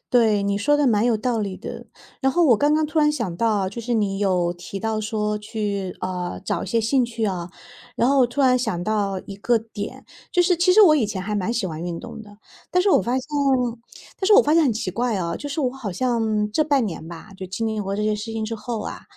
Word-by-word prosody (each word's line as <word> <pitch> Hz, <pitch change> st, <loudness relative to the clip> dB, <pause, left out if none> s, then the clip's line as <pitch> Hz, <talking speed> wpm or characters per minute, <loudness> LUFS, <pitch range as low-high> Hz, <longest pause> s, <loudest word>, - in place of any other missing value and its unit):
对， 220 Hz, -4 st, +3 dB
你 200 Hz, 0 st, 0 dB
说 290 Hz, +8 st, +3 dB
得 295 Hz, -, +2 dB
蛮 215 Hz, -3 st, +3 dB
有 235 Hz, -, +3 dB
道 240 Hz, +1 st, -1 dB
理 200 Hz, -3 st, -3 dB
的。 -, -, -8 dB, 0.3 s
然 265 Hz, -, +2 dB
后 350 Hz, +3 st, +3 dB
我 245 Hz, -8 st, +5 dB
刚 295 Hz, +4 st, +3 dB
刚 310 Hz, 0 st, +2 dB
突 310 Hz, +1 st, -2 dB
然 300 Hz, -1 st, +4 dB
想 230 Hz, -, -3 dB
到 215 Hz, -1 st, +1 dB
哦， -, -, -1 dB
就 235 Hz, -, -6 dB
是 240 Hz, +1 st, -2 dB
你 200 Hz, -3 st, 0 dB
有 180 Hz, -4 st, +1 dB
提 180 Hz, +3 st, -8 dB
到 220 Hz, 0 st, -1 dB
说 210 Hz, -1 st, -2 dB
去， 210 Hz, -3 st, -4 dB
呃， 180 Hz, -1 st, -4 dB
找 -, -, -1 dB
一 -, -, -9 dB
些 230 Hz, -, +1 dB
兴 250 Hz, +4 st, +2 dB
趣 230 Hz, -1 st, -3 dB
啊。 180 Hz, -4 st, -3 dB, 0.4 s
然 240 Hz, -, +2 dB
后 270 Hz, -2 st, +4 dB
突 245 Hz, +4 st, -4 dB
然 255 Hz, -2 st, +4 dB
想 220 Hz, -8 st, -2 dB
到 200 Hz, -1 st, -1 dB
一 195 Hz, -, -8 dB
个 235 Hz, +4 st, +2 dB
点， 215 Hz, -2 st, -8 dB, 0.3 s
就 360 Hz, -, +4 dB
是 355 Hz, 0 st, +2 dB
其 365 Hz, +2 st, +4 dB
实 435 Hz, -, +6 dB
我 315 Hz, -6 st, +7 dB
以 235 Hz, -8 st, +1 dB
前 195 Hz, -3 st, -4 dB
还 210 Hz, +2 st, -3 dB
蛮 205 Hz, +3 st, -1 dB
喜 235 Hz, -4 st, -1 dB
欢 155 Hz, -1 st, -6 dB
运 170 Hz, -1 st, -4 dB
动 -, -, -9 dB
的， 205 Hz, -1 st, -14 dB, 0.3 s
但 360 Hz, -, +3 dB
是 400 Hz, -, +3 dB
我 -, -, +5 dB
发 235 Hz, +6 st, -2 dB
现 260 Hz, -, -1 dB, 1.0 s
但 380 Hz, -, -1 dB
是 425 Hz, -, +5 dB
我 470 Hz, -, +8 dB
发 300 Hz, -, +1 dB
现 330 Hz, -1 st, +5 dB
很 260 Hz, -, +2 dB
奇 215 Hz, -3 st, -3 dB
怪 235 Hz, +4 st, -1 dB
啊， 170 Hz, -3 st, -2 dB
就 290 Hz, -, -6 dB
是 285 Hz, +2 st, -3 dB
我 260 Hz, -3 st, +1 dB
好 250 Hz, -7 st, -5 dB
像 220 Hz, -1 st, 0 dB
这 310 Hz, +9 st, +2 dB
半 280 Hz, -5 st, +2 dB
年 165 Hz, -5 st, -5 dB
吧， 170 Hz, +5 st, -10 dB
就 190 Hz, -, -6 dB
经 190 Hz, +5 st, -3 dB
历 220 Hz, -1 st, -2 dB
过 195 Hz, -1 st, -3 dB
这 210 Hz, -, -2 dB
些 215 Hz, 0 st, +1 dB
事 210 Hz, +2 st, -5 dB
情 220 Hz, -1 st, -2 dB
之 225 Hz, +1 st, -3 dB
后 230 Hz, 0 st, -4 dB
啊， -, -, -6 dB
220 Hz, 285 characters per minute, -23 LUFS, 200-255 Hz, 1.0 s, 我